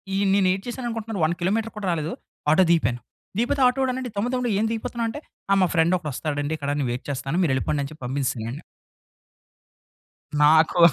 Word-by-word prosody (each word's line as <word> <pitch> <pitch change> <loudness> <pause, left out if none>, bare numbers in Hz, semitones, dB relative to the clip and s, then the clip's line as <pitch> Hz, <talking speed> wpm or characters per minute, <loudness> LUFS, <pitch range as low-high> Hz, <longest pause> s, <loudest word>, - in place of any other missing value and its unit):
ఈ - - +1 0.2
నేనేటి 190 -1 +3
చేశానుకుంటున్నరు 225 -5 -4
1 170 +2 0
కిలోమీటర్ 215 +5 0
కూడా 200 -3 -3
రాలేదు. 160 0 -2 0.4
ఆటో 185 +4 +6
దిగిపాను. 125 -8 +2 0.4
దిగిపోతే 265 +4 +1
ఆటో 250 +2 0
వాడన్నాడు 255 -1 -1
"తమ్ముడు 225 +5 -1
తమ్ముడు 250 -1 0
ఏం 220 - +2
దిగిపోతున్నావు" 230 0 -2
అంటే 290 - -6 0.3
ఆ! - - +7
మా 185 - +4
ఫ్రెండ్ 165 +3 +4
ఒకడు 155 -4 -5
వస్తాడండి. 145 +1 -2
ఇక్కడ 145 -1 -4
నేను 135 - 0
వెయిట్ 120 - -5
చేస్తాను. 135 +5 -2
మీరు 160 - +2
వెళ్ళిపొండని 140 +1 -1
చెప్పి 155 - -13
పంపించాసానాన్ని. 130 0 -2 1.8
నాకు 160 +3 +5
175 Hz, 170 wpm, -24 LUFS, 145-225 Hz, 1.8 s, ఆ